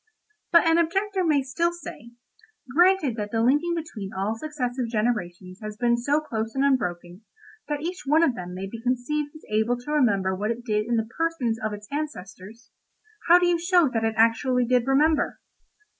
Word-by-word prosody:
"But 335 -1 +6
an 330 +1 +4
objector 385 +3 0
may 300 -5 +2
still 335 +6 0
say, 240 -8 -10 0.6
'Granted 350 -6 +3
that 210 -1 -3
the 225 +1 0
linking 295 +8 +2
between 245 -12 -6
all 195 +2 -2
successive 255 -2 -3
generations 200 -5 -2
has 215 0 -7
been 240 0 +2
so 280 +5 +1
close 225 -6 -4
and 270 +1 +2
unbroken, 180 -8 -1 0.5
that 295 -1 -3
each 360 +3 -4
one 310 +4 +4
of 270 - +3
them 180 -4 -7
may 190 +1 -5
be 225 +4 -8
conceived 255 +5 -1
as 310 - -13
able 220 +3 +1
to 245 +5 -8
remember 200 -10 +2
what 205 +3 -2
it 235 +1 -4
did 210 -1 0
in 240 - 0
the 225 -1 0
persons 285 -9 0
of 215 - -1
its 210 0 -8
ancestors—how 280 - -3
do 355 - +2
you 350 -1 +2
show 345 -3 +3
that 225 -3 -2
it 225 0 0
actually 245 +3 +3
did 250 0 +1
remember? 295 +3 +2
245 Hz, 185 wpm, -25 LUFS, 220-310 Hz, 0.6 s, But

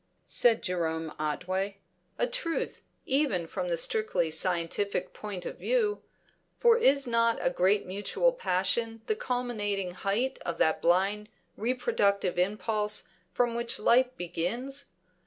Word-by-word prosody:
said 230 -2 +2
Jerome 160 -3 -2
Otway. 185 +6 -2 0.4
A - - +2
truth, 485 -10 -3 0.2
even 265 - +1
from 180 +2 -4
the 170 -1 0
strictly 175 -3 +1
scientific 180 +3 -1
point 200 -4 -6
of - - -6
view; 450 -4 +1 0.6
for 475 -1 +6
is 280 - +4
not 230 -1 +2
a - - +1
great 190 +3 +2
mutual 205 - +1
passion 225 - 0
the 435 - 0
culminating 220 - -2
height 210 +9 -1
of 170 -1 -3
that 160 - +2
blind 195 +5 +2 0.3
reproductive 200 - +1
impulse 210 +2 0 0.2
from 240 -1 +1
which 235 0 -1
life 245 +4 +4
begins? 240 +12 -3
210 Hz, 125 wpm, -29 LUFS, 180-245 Hz, 0.6 s, for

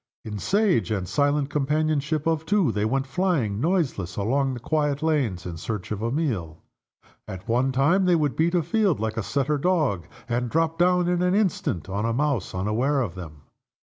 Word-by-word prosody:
In 105 -2 -5
sage 180 - +2
and 95 -4 -2
silent 145 +2 +1
companionship 150 +1 0
of 160 -1 +1
two, 195 - +2
they 105 0 -1
went 135 +4 0
flying, 135 - 0
noiseless, 145 - 0
along 130 +6 0
the - - -6
quiet 150 +2 -1
lanes 135 - 0
in 85 -2 -5
search 105 +3 -5
of 105 -1 -3
a 115 +1 -1
meal. 110 - -2 0.6
At 95 -1 -8
one 125 +3 +2
time 155 +9 +3
they 180 -1 +4
would 150 -4 0
beat 170 +3 +1
a 170 - +2
field 190 - +1
like 110 0 -2
a - - +1
setter 140 +6 -1
dog, 145 - +1 0.2
and 120 0 -1
drop 165 +3 0
down 180 0 +3
in 175 0 +1
an 180 +1 +2
instant 180 - 0
on 100 +4 -2
a 115 - 0
mouse 135 -8 -1
unaware 115 +10 0
of 115 -10 -2
them. 80 -5 -10
140 Hz, 190 wpm, -25 LUFS, 110-160 Hz, 0.6 s, they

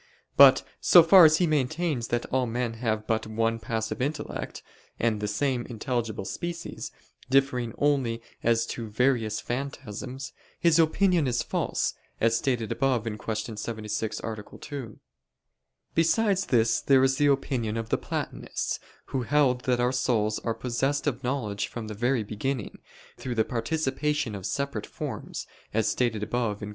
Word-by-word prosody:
But - - +8 0.2
so 175 - +8
far 175 +1 +9
as 155 0 +6
he 180 - +3
maintains 150 -3 0
that 120 0 -1
all 130 -1 +2
men 120 0 -2
have 110 -3 0
but 110 0 -1
one 115 +1 0
passive 110 +1 -3
intellect, 145 +4 -4 0.4
and 110 -3 +1
the 105 - -1
same 125 +3 0
intelligible 115 -4 -3
species, 170 - -5 0.4
differing 130 -4 +2
only 135 -6 +1 0.2
as 115 0 +2
to 115 -2 -6
various 115 -1 +1
phantasms, 130 0 -5 0.3
his 170 -1 +4
opinion 165 -1 +3
is 125 -1 0
false, - - -1 0.3
as 115 0 +3
stated 120 -4 0
above 130 -5 +1
(Q. 110 0 -4
76, 105 0 -3
A. 110 -2 -6
2). 130 -8 -7 0.9
Besides 195 +4 +2
this, 115 -2 +3
there 135 -1 +5
is 135 0 +3
the 145 - +3
opinion 125 -5 0
of 115 0 -4
the - - +2
Platonists, - - -3 0.3
who 135 - +1
held 125 -1 +2
that 125 -1 +2
our 125 +1 +2
souls 115 -4 +1
are 115 -1 -2
possessed 135 +4 -1
of 135 -3 -1
knowledge 110 -6 -2
from 115 -2 -6
the 105 - -5
very 120 +2 +1
beginning, 110 +2 -4 0.4
through 125 -2 -4
the 110 - +2
participation 145 +1 -1
of 100 -1 -4
separate 140 -5 -3
forms, - - -6 0.3
as 110 -1 +2
stated 115 -4 0
above 110 -1 -1
(Q. 105 - -5
120 Hz, 155 wpm, -27 LUFS, 110-140 Hz, 0.9 s, far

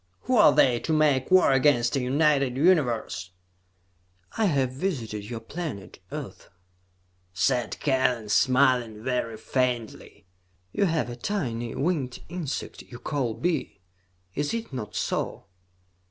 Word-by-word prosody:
"Who 255 - 0
are 210 - +8
they, 120 -3 +4
to 160 - -3
make 145 -4 +2
war 185 -5 +6
against 130 -2 +3
a - - +2
united 140 -1 +2
Universe?" 130 - +1 1.1
"I 220 - +2
have 135 -8 +1
visited 120 - -4
your 120 -2 -4
planet, 130 - -7
Earth," - - -7 0.8
said 125 +5 0
Kellen, 130 -5 +1
smiling 125 -2 +3
very 125 -3 -2
faintly. 120 -3 -3 0.5
"You 200 - +1
have 160 -8 0
a - - -6
tiny 120 - -3
winged 140 -5 -1
insect 170 -5 -5
you 120 - -11
call 125 -4 -2
bee. 170 - -2 0.5
Is 145 +9 -1
it 225 -10 -5
not 105 -5 -6
so?" - - -2
130 Hz, 125 wpm, -26 LUFS, 120-155 Hz, 1.1 s, are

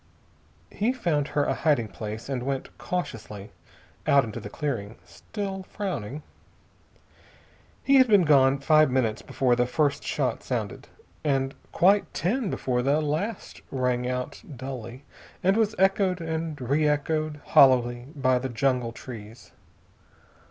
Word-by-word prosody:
He 225 +5 0
found 165 - 0
her 145 -1 0
a - - +1
hiding 145 -8 +1
place 110 +1 -7
and 135 -3 -2
went 135 +1 -4
cautiously 110 - -5 0.6
out 140 -1 +5
into 110 -3 -6
the 105 - -8
clearing, 115 -6 -4
still 195 -2 -6
frowning. 155 - -5 1.6
He 275 0 +5
had 260 -1 +6
been 205 -4 +5
gone 135 -3 +5
five 155 +2 +4
minutes 125 -4 0
before 125 -2 +1
the 125 0 +1
first 145 +1 0
shot - - -1
sounded, - - -4 0.4
and 135 -2 0 0.2
quite 195 +3 +3
ten 215 +5 0
before 125 -6 -1
the 140 +4 +2
last 155 +9 -3
rang 125 -2 0
out 125 0 -4
dully, 130 0 -7 0.4
and 190 +2 +4
was 220 -1 +1
echoed 190 -1 +2
and 160 -2 -3
re 140 +5 +1
echoed 150 +1 -1
hollowly 120 -2 +5
by 130 -2 +2
the 130 +1 -4
jungle 125 -1 0
trees. 115 -2 -10
140 Hz, 135 wpm, -26 LUFS, 125-165 Hz, 1.6 s, had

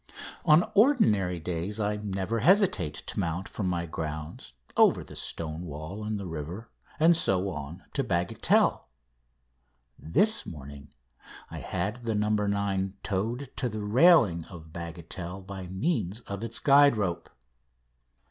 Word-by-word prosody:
On 155 +3 +5
ordinary 110 - +3
days 90 +5 -3
I 105 0 0
never 105 +2 -2
hesitate 175 - +3
to - - -4
mount 85 +3 -2
from 100 - -3
my 85 -1 -1
grounds, 75 -4 -6 0.2
over - - +4
the - - -12
stone 80 +1 -4
wall 80 +8 -7
and 105 -1 -3
the 100 - -6
river, 85 +7 -6 0.3
and 165 +2 +6
so 95 - +1
on 75 +5 -7
to - - 0
Bagatelle. 85 -6 +1 1.1
This 215 - +2
morning 70 -2 -10 0.6
I - - -6
had 100 +7 -3
the 110 - 0
"No. 105 0 +1
9" 100 -2 0
towed 115 +7 -2
to 125 - 0
the 110 -1 -5
railing 110 - +5
of 80 -3 -12
Bagatelle 85 +2 -7
by 95 -2 -7
means 100 - -2
of 100 -1 -6
its 115 0 -1
guide 140 -3 +5
rope. 95 -5 -2
95 Hz, 140 wpm, -28 LUFS, 85-110 Hz, 1.1 s, and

